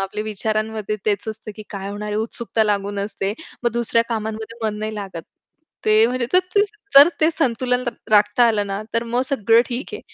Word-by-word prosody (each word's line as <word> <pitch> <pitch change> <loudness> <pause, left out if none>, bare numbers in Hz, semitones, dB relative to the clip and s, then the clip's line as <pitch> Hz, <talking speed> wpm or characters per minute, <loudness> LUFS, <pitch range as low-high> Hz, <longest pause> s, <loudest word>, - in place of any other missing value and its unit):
आपल्या 200 +2 -3
विचारांमध्ये 215 0 -2
तेच 210 +1 0
असतं, 220 0 -6
की 215 - -8
काय 195 -1 -5
होणार 205 +1 -5
आहे, 210 - -2
उत्सुकता 225 0 -1
लागून 205 -1 -1
असते. 200 -1 -3 0.3
मग 240 - +2
दुसऱ्या 230 -1 +1
कामांमध्ये 220 0 -4
मन 210 -1 -3
नाही 215 0 -4
लागत. 195 -5 -6 0.6
ते 215 +1 +5
म्हणजे 250 0 -1
तर 365 - +7 0.2
ते 405 - +5 0.3
जर 280 +3 +10
ते 315 +1 +5
संतुलन 250 -5 0 0.3
राखता 210 +3 +5
आलं 210 -2 +1
ना, 200 +1 -3
तर 230 - +2
मग 240 +2 0
सगळं 230 -4 +4
ठीक 245 +4 -4
आहे. 430 - -6
220 Hz, 190 wpm, -21 LUFS, 210-235 Hz, 0.6 s, जर